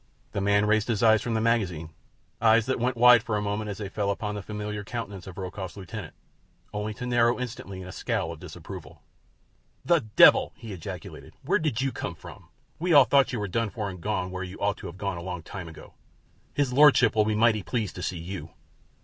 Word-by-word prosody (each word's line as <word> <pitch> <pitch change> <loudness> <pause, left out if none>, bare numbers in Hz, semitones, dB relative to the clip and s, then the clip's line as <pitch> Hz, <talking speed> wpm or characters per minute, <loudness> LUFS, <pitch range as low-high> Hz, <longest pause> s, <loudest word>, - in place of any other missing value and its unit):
The 100 - -2
man 100 +1 +3
raised 110 0 +2
his 115 -2 0
eyes 110 -1 +6
from 115 -2 -2
the 110 - +1
magazine—eyes 110 - 0
that 130 0 -1
went 125 +1 0
wide 120 -1 +8
for 105 -1 -2
a - - -1
moment 105 +1 -2
as 100 - -5
they 105 - -5
fell 100 +1 -2
upon 105 +1 -2
the 105 - -4
familiar 105 +1 -5
countenance 100 -4 -6
of 95 - -9
Rokoff's 95 0 -6
lieutenant, 95 -4 -8 0.6
only 105 +1 -3
to 125 - -6
narrow 120 0 +2
instantly 100 -6 -6
in - - -9
a - - -7
scowl - - -2
of - - -9
disapproval. - - -10 0.8
"The 170 -1 +4
devil!" 110 -6 +5
he 110 -3 -9
ejaculated. 85 -4 -8
"Where - - +2
did 145 -6 -1
you 135 0 0
come 85 -6 -5
from? - - -13 0.3
We 175 +1 +1
all 140 -3 +9
thought 140 0 +4
you 125 - -2
were 105 - -2
done 115 +4 -1
for 105 -2 -4
and 90 -1 -10
gone 95 -3 -2
where 95 0 -5
you 95 +1 -7
ought 100 0 0
to - - -8
have 85 - -9
gone 100 -2 -3
a - - -6
long 90 -2 -5
time 90 0 -7
ago. 80 -1 -12 0.6
His 140 -3 0
lordship 135 -5 +6
will 105 -1 +4
be 110 0 0
mighty 110 -1 +3
pleased 110 0 -2
to 90 - -7
see 90 +1 -3
you." 90 +3 -6
105 Hz, 220 wpm, -27 LUFS, 95-115 Hz, 0.8 s, all